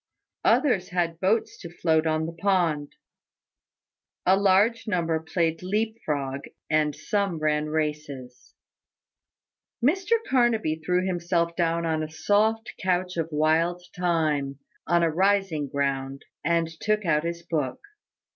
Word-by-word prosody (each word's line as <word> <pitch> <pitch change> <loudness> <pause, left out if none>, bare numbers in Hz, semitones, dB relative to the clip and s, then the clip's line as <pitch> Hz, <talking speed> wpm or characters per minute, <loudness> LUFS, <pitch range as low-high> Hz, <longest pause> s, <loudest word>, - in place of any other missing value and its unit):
Others 230 -11 +3
had 170 -2 -1
boats 205 +5 0
to 170 - -8
float 160 -2 +1
on 155 0 +1
the 165 - -4
pond. 165 -5 0 1.3
A 185 - +6
large 200 +4 +3
number 170 -5 0
played 165 0 -1
leap 215 +4 -1
frog, 140 -2 -2 0.3
and 150 -1 +2
some 200 -5 -1
ran 155 0 0
races. 150 -5 -4 1.3
Mr 375 - +2
Carnaby 225 -11 +2
threw 180 +2 +1
himself 170 -2 0
down 170 -1 0
on 160 -1 0
a 155 - -4
soft 215 +7 +1
couch 180 0 0
of 165 -1 -2
wild 160 +4 +1
thyme, 155 -6 0 0.3
on 170 0 +3
a 165 - +2
rising 190 -4 +1
ground, 135 -1 -2 0.2
and 165 +1 +2
took 215 -1 0
out 150 -2 +2
his 170 0 -4
book. 155 -6 -2
170 Hz, 130 wpm, -26 LUFS, 155-190 Hz, 1.3 s, A